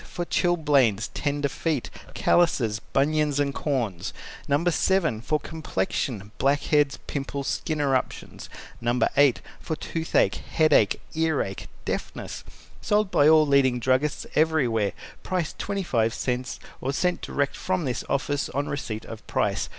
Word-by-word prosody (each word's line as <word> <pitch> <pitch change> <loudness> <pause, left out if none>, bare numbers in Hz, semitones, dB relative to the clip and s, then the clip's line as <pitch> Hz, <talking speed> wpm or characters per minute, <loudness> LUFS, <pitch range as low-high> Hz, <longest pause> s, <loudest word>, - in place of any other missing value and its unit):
For 175 -1 -5
Chilblains, 145 - +2
tender 145 -1 -1
feet, 150 -1 -2 0.2
callouses, 125 -11 +2
bunions, 150 +1 +2
and 140 -1 +1
corns. 120 - -2 0.3
No. 145 +4 +1
7. 170 - +2
For 150 +5 0
complexion, 110 -8 -3
blackheads, 145 +1 +2
pimples, 140 -1 -4
skin 155 -3 -2
eruptions. 135 -3 -2 0.3
No. 120 +1 +1 0.2
8. 140 -3 +4 0.2
For 160 - -3
toothache, 165 +1 0
headache, 155 -10 +4
earache, 160 -11 -1 0.2
deafness. - - -4 0.4
Sold 210 -2 +1
by 145 +1 +5
all 155 -1 +6
leading 135 -3 +3
druggists 130 +5 +1
everywhere. 130 -10 +2 0.3
Price 180 -4 -2
25 130 - -1
cents 125 0 -2 0.2
or 135 - -1
sent 180 +4 0
direct 140 0 -1
from 185 -3 -1
this 125 -3 -2
office 145 +1 0
on 140 +2 -2
receipt 110 -6 -4
of 115 -1 -10
price. - - 0
140 Hz, 125 wpm, -25 LUFS, 125-160 Hz, 0.4 s, all